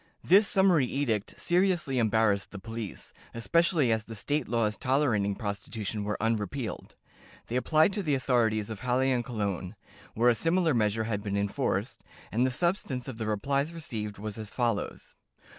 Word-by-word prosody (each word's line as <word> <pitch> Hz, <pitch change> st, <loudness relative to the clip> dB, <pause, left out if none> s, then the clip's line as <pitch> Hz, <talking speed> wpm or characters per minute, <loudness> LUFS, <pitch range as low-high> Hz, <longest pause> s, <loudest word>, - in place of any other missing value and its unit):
This 200 Hz, +3 st, +6 dB
summary 185 Hz, -10 st, +4 dB
edict 115 Hz, -7 st, -2 dB
seriously 175 Hz, -7 st, +1 dB
embarrassed 110 Hz, -3 st, +2 dB
the 105 Hz, -, -9 dB
police, 115 Hz, 0 st, -7 dB, 0.2 s
especially 160 Hz, +2 st, +2 dB
as 110 Hz, -1 st, +1 dB
the 115 Hz, -, -8 dB
state 145 Hz, +6 st, -1 dB
laws 110 Hz, -2 st, +1 dB
tolerating 120 Hz, -7 st, +1 dB
prostitution 105 Hz, 0 st, -4 dB
were 105 Hz, +1 st, -2 dB
unrepealed. 110 Hz, +2 st, -2 dB, 0.5 s
They 120 Hz, -, -5 dB
applied 155 Hz, +8 st, +3 dB
to 205 Hz, -, -1 dB
the 150 Hz, -6 st, +1 dB
authorities 115 Hz, -5 st, +1 dB
of 110 Hz, -, -6 dB
Halle 130 Hz, +3 st, +1 dB
and 125 Hz, -2 st, +1 dB
Cologne, 100 Hz, -6 st, -3 dB, 0.4 s
where 120 Hz, +2 st, +5 dB
a -, -, +3 dB
similar 165 Hz, +6 st, +2 dB
measure 110 Hz, -1 st, +1 dB
had 110 Hz, -2 st, -2 dB
been 100 Hz, -1 st, -2 dB
enforced, 100 Hz, 0 st, -1 dB, 0.3 s
and 120 Hz, +5 st, +2 dB
the -, -, +1 dB
substance 145 Hz, -3 st, -1 dB
of 125 Hz, -4 st, -7 dB
the 110 Hz, -, -2 dB
replies 140 Hz, +9 st, -1 dB
received 105 Hz, -10 st, -5 dB
was 105 Hz, +1 st, -6 dB
as 110 Hz, -2 st, -6 dB
follows. 115 Hz, -4 st, -2 dB
115 Hz, 160 wpm, -29 LUFS, 105-140 Hz, 0.5 s, This